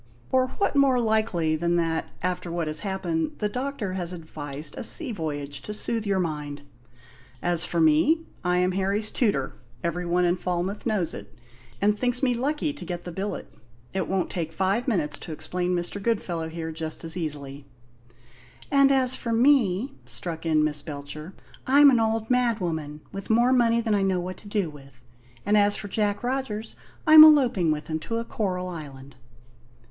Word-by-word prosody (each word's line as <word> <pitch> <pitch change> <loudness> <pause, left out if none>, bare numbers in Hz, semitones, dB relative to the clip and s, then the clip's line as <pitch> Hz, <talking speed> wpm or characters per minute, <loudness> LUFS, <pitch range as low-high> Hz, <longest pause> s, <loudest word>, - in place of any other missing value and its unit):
Or 260 0 +3
what 400 - 0
more 275 -3 +4
likely 215 -8 +1
than 170 +2 0
that, 165 -1 0 0.2
after 180 -1 -2
what 170 -1 -1
has 155 0 -1
happened, 175 -5 -2
the 210 - 0
doctor 250 -4 -3
has 180 -1 -1
advised 150 -3 -5
a - - -5
sea 285 +3 +3
voyage, 145 -6 -4
to 210 - -5
soothe 225 0 +1
your 195 -1 +1
mind? 150 -5 -3 0.8
As 175 -1 +1
for 170 - -1
me, 160 - +4 0.2
I 180 0 +1
am 180 +1 +2
Harry's 195 +3 -1
tutor; 200 - 0 0.3
every 175 +1 -2
one 175 +1 +2
in 175 +1 +2
Falmouth 180 +5 -3
knows 190 -7 0
it, 100 0 -9 0.5
and 210 +1 +3
thinks 250 +1 0
me 250 -2 +3
lucky 290 +5 -1
to 290 - -9
get 175 -1 -5
the 175 - -6
billet. 195 +4 -5 0.4
It 190 -1 -1
won't 190 -1 -1
take 165 -3 -3
five 195 +8 0
minutes 150 - 0
to - - -8
explain 180 +4 -2
Mr. 175 +3 -3
Goodfellow 180 -7 -1
here, 160 0 -5
just 160 +1 -4
as 165 0 +1
easily 145 -4 -4 0.5
" 120 -1 -24
"And 275 -1 +5
as 260 -1 +3
for 230 - -4
me," 240 -1 +3
struck 165 -2 -5
in 155 -1 +3
Miss 150 -1 -1
Belcher, 145 +4 -8 0.3
"I'm 285 +2 +7
an 245 - +3
old 225 0 0
madwoman, 175 -12 -1
with 195 0 -7
more 240 +3 +4
money 235 -2 +3
than 225 -2 0
I 200 - +2
know 190 -2 +1
what 180 +1 -5
to 210 - -13
do 205 -3 0
with. 135 -4 -15 0.5
And 205 +1 +3
as 205 0 +4
for 205 - -6
Jack 205 +2 -1
Rogers, 245 -4 -3 0.3
I'm 310 -1 +11
eloping 255 - +5
with 150 0 -2
him 155 0 -3
to 230 +8 -4
a 230 - -3
coral 185 -5 -2
island." 140 -6 -9
180 Hz, 185 wpm, -25 LUFS, 160-225 Hz, 0.8 s, I'm